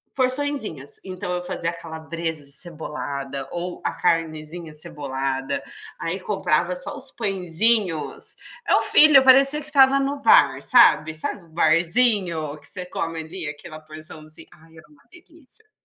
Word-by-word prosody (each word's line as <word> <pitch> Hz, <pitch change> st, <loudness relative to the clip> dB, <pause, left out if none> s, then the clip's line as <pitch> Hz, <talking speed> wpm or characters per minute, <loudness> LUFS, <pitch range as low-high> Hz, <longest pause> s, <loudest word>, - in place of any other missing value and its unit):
Porçõezinhas.", 255 Hz, -, -1 dB
então 185 Hz, 0 st, -6 dB
eu 180 Hz, 0 st, -3 dB
fazia 170 Hz, -1 st, -3 dB
a -, -, -11 dB
calabresa 165 Hz, -1 st, -6 dB
de 140 Hz, -, -5 dB
cebolada 140 Hz, -3 st, -2 dB
ou 175 Hz, +1 st, -5 dB
a -, -, 0 dB
carnezinha 160 Hz, 0 st, -2 dB
cebolada, 135 Hz, -4 st, -4 dB, 0.4 s
aí 175 Hz, +4 st, -4 dB
comprava 180 Hz, -3 st, -1 dB
só 180 Hz, -, -1 dB
os 270 Hz, -1 st, +3 dB
pãezinhos, 200 Hz, -, -1 dB, 0.3 s
meu -, -, +3 dB
filho 300 Hz, -3 st, +7 dB
parecia 275 Hz, +3 st, +6 dB
que 300 Hz, -, -8 dB
estava 275 Hz, -2 st, +4 dB
no 280 Hz, +1 st, -2 dB
bar, 470 Hz, -, +4 dB
sabe, 155 Hz, +1 st, +5 dB
sabe 170 Hz, +3 st, -5 dB
o -, -, -23 dB
barzinho, 170 Hz, -1 st, +1 dB
que -, -, -15 dB
você 185 Hz, -2 st, -5 dB
come 165 Hz, -2 st, -4 dB
ali 160 Hz, +1 st, -7 dB
aquela 155 Hz, +2 st, -10 dB
porçãozinha, 155 Hz, 0 st, -11 dB
ai, 160 Hz, +1 st, -21 dB
era 160 Hz, -, -16 dB
uma 295 Hz, -2 st, -24 dB
delícia. 335 Hz, -, -21 dB
170 Hz, 145 wpm, -22 LUFS, 155-250 Hz, 0.4 s, filho